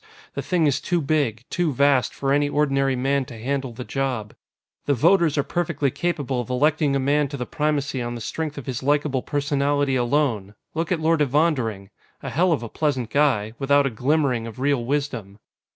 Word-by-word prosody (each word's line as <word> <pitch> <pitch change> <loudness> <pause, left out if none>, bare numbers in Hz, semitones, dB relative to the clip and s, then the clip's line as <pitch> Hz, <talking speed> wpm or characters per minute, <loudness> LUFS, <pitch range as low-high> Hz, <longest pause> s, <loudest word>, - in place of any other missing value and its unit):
The - - -3
thing 175 -4 +1
is 145 -1 +1
too 175 +2 0
big, 140 -7 0
too 175 -3 +1
vast, 140 -2 +3
for 135 0 -1
any 145 0 +2
ordinary 135 -2 +1
man 135 +2 +1
to 120 - -10
handle 135 +2 -2
the 115 +2 -7
job. 125 -6 -3 0.5
The 145 - +3
voters 165 +3 +3
are 145 - +3
perfectly 155 -5 -1
capable 145 -7 -1
of 120 - -9
electing 145 +2 +2
a - - +2
man 145 +2 +2
to 140 - -6
the 125 - -3
Primacy 145 -3 -1
on 120 0 -3
the - - -6
strength 150 +6 -4
of 140 - -6
his 130 -3 -4
likable 145 -1 +1
personality 145 -1 0
alone 120 -6 0 0.2
look 165 +2 -2
at 175 - +1
Lord 160 0 +2
Evondering. 130 -9 0 0.3
A - - -4
hell 175 +4 +2
of 140 -7 0
a - - -4
pleasant 130 -6 -1
guy, 125 -8 +2
without 140 +1 +3
a 135 - 0
glimmering 130 -1 0
of 115 - -9
real 140 -2 +1
wisdom. 125 -7 -3
140 Hz, 195 wpm, -23 LUFS, 125-150 Hz, 0.5 s, vast